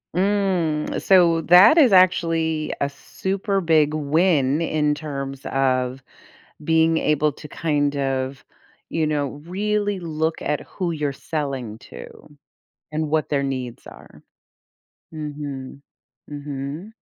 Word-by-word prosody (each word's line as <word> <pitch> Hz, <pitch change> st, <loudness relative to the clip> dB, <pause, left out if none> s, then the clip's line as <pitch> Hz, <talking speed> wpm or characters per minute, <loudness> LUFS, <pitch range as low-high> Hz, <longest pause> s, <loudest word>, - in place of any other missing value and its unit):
Mm. 185 Hz, -5 st, 0 dB
So, 170 Hz, -4 st, +4 dB
that 185 Hz, -, +7 dB
is 265 Hz, -9 st, +6 dB
actually 165 Hz, -4 st, +2 dB
a 140 Hz, -, 0 dB
super 195 Hz, +7 st, -3 dB
big 155 Hz, -3 st, +3 dB
win 155 Hz, -1 st, +2 dB
in 150 Hz, -2 st, +1 dB
terms 140 Hz, -3 st, -6 dB
of 130 Hz, -1 st, 0 dB, 0.6 s
being 160 Hz, 0 st, +3 dB
able 150 Hz, 0 st, +1 dB
to 150 Hz, +2 st, -12 dB
kind 145 Hz, -3 st, -1 dB
of, 135 Hz, -1 st, -2 dB, 0.5 s
you 160 Hz, -1 st, 0 dB
know, 145 Hz, -2 st, 0 dB, 0.2 s
really 205 Hz, +2 st, -1 dB
look 160 Hz, -1 st, -2 dB
at 150 Hz, -, -1 dB
who 180 Hz, -3 st, -4 dB
you're 150 Hz, -3 st, -2 dB
selling 135 Hz, -9 st, -4 dB
to -, -, -11 dB, 0.8 s
and 155 Hz, 0 st, -2 dB
what 155 Hz, 0 st, 0 dB
their 140 Hz, -2 st, 0 dB
needs 130 Hz, -3 st, -5 dB
are. -, -, -14 dB, 0.9 s
Mhm. 145 Hz, -3 st, -7 dB, 0.5 s
Mhm. 145 Hz, +6 st, -6 dB
155 Hz, 115 wpm, -22 LUFS, 140-170 Hz, 0.9 s, that